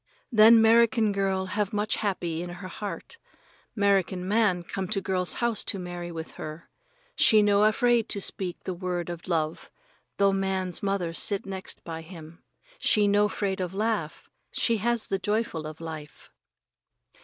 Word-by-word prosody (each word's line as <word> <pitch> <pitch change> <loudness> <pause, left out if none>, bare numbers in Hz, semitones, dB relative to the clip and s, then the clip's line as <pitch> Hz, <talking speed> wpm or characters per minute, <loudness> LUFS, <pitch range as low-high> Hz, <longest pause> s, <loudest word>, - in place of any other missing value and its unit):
Then 225 0 +8
'Merican 230 -1 +4
girl 195 -1 0
have 205 +1 -2
much 210 +1 0
happy 175 -6 -2
in 175 - -5
her 180 +2 -8
heart. 205 - -7 0.6
'Merican 195 -2 +2
man 200 -4 +2
come 190 +2 -4
to 200 +1 0
girl's 185 -1 -1
house 235 -3 0
to - - +1
marry 175 -1 -6
with 160 -1 -7
her. 155 +2 -8 0.4
She 215 -1 +5
no 205 0 +4
afraid 235 +1 +2
to 200 - 0
speak 185 -2 -3
the 185 - -3
word 175 -1 -3
of 170 +1 -8
love, 160 -2 -2 0.5
though 200 -1 +3
man's 190 -2 -1
mother 195 -4 -1
sit 200 +3 0
next 190 -1 -6
by 165 -1 -6
him. 165 -1 -12 0.4
She 210 -1 +3
no 205 +1 +3
'fraid 195 -1 -2
of 180 +1 -4
laugh. 210 -7 -2 0.2
She 230 -2 +1
has 235 +2 0
the 195 - -2
joyful 205 -6 -2
of 155 0 -9
life. 155 -3 -9
195 Hz, 160 wpm, -27 LUFS, 175-210 Hz, 0.6 s, Then